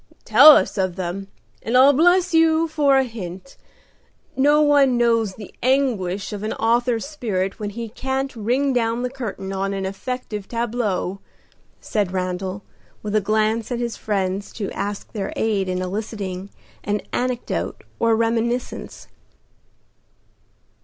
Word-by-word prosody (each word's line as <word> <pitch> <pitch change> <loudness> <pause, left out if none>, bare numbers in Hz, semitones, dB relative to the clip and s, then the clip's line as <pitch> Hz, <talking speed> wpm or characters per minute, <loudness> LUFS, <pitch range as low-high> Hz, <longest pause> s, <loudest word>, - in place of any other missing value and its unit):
"Tell - - +9
us - - -1
one 190 - +3
of 180 - -12
them, 185 +1 -4 0.3
and 235 +3 +1
I'll 270 +2 +7
bless 355 +5 +3
you 325 0 +4
for 290 -3 +3
a 265 - +4
hint. 220 -1 -8 0.8
No 290 +3 +4
one 285 -4 +4
knows 230 -4 +2
the 210 -3 -11
anguish 215 -8 0
of 205 - -5
an 215 - -2
author's 235 +1 +1
spirit 210 -10 -3
when 210 -1 -3
he 230 +3 -6
can't 265 +4 -3
ring 250 +5 0
down 235 0 0
the 250 - -2
curtain 200 -7 -5
on 195 +1 -2
an 195 -1 -3
effective 210 +1 -5
tableau," 230 -5 -2 0.6
said 205 -4 -1
Randal, 185 +1 -3 0.4
with 210 0 -3
a 215 - +4
glance 215 +3 0
at 245 - -1
his 235 -1 -3
friends 195 -1 -2
to 205 -3 -4
ask 205 0 -5
their 205 -4 -4
aid 200 -4 0
in 185 0 -1
eliciting 195 -1 -5 0.3
an 210 0 -1
anecdote 250 -1 -2 0.2
or 230 -1 +3
reminiscence. 230 +2 -2
225 Hz, 145 wpm, -22 LUFS, 195-250 Hz, 0.8 s, Tell